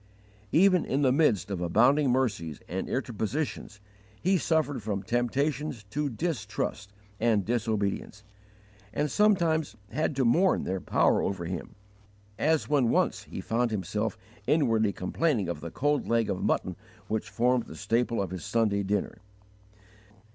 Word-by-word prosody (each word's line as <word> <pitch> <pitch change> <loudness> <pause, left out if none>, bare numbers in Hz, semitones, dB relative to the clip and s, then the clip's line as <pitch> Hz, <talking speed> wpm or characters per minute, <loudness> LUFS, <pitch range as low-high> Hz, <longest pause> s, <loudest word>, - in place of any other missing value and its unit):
Even 185 0 +5
in 140 +3 0
the 130 - +4
midst 120 - +2
of 95 -3 -3
abounding 125 - +4
mercies 105 - 0
and 95 +2 -4
interpositions 125 -2 -3 0.4
he 190 +2 +2
suffered 155 -6 +1
from 100 -2 -3
temptations 130 +3 -1
to 150 +2 -1
distrust 120 - -3 0.3
and 110 -4 +2
disobedience, 105 -3 -2 0.7
and 150 +4 -1
sometimes 170 - +2 0.2
had 150 +3 -1
to 135 -1 +1
mourn 175 +11 +3
their 95 0 -2
power - - +2
over 95 -3 -2
him, 85 -1 -5 0.6
as 160 +1 +2
when 140 -5 +2
once - - +1
he - - -6
found 120 +1 0
himself 105 +2 -2 0.3
inwardly 115 -9 +3
complaining 105 - 0
of 85 -3 -4
the 85 - -5
cold 145 - 0
leg 115 -1 +1
of 90 - -3
mutton - - 0 0.3
which 110 0 -2
formed 125 +1 +1
the - - -9
staple 115 +3 0
of 95 -3 -2
his 90 -4 -5
Sunday 110 -3 +1
dinner! 100 +2 -2
115 Hz, 140 wpm, -28 LUFS, 100-145 Hz, 0.7 s, Even